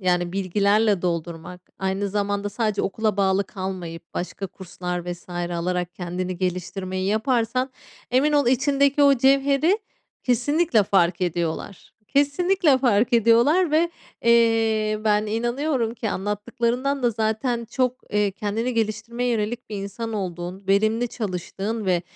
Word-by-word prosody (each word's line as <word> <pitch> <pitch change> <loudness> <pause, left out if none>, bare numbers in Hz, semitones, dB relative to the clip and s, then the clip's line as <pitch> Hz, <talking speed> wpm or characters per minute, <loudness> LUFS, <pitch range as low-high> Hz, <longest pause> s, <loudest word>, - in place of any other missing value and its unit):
yani, 180 -1 +1
bilgilerle 200 +1 +2
doldurmak, 170 0 -3 0.2
aynı 190 +1 -1
zamanda 205 0 -1
sadece 215 -1 -1
okula 215 +1 -1
bağlı 195 0 +2
kalmayıp 180 -4 -7
başka 190 +2 -4
kurslar 180 -1 -5
vs. 175 - -13
alarak 175 0 -2
kendini 180 +1 -4
geliştirmeyi 185 +1 -3
yaparsan, 235 +4 +1 0.4
emin 275 +4 +3
ol 290 -3 +3
içindeki 275 +3 +3
o 280 -1 +7
cevheri 275 - +3 0.4
kesinlikle 255 0 +2
fark 185 -3 +2
ediyorlar, 175 +2 -3
kesinlikle 290 +1 +3
fark 240 -3 +2
ediyorlar 235 - +4
ve, 335 +2 +3 0.3
eee, 225 -2 +3
ben 210 0 +2
inanıyorum 240 +2 -1
ki 225 -2 -3
anlattıklarından 235 +7 -1
da 240 - +3
zaten 225 +2 -1
çok, 255 -1 0
eee, 210 -1 +2
kendini 215 +5 -2
geliştirmeye 230 +2 -1
yönelik 230 +1 -2
bir 210 - -4
insan 200 +3 -5
olduğun, 180 -1 -4
verimli 220 +4 +2
çalıştığın 205 +1 -4
ve 180 -2 +2
215 Hz, 125 wpm, -23 LUFS, 185-245 Hz, 0.4 s, o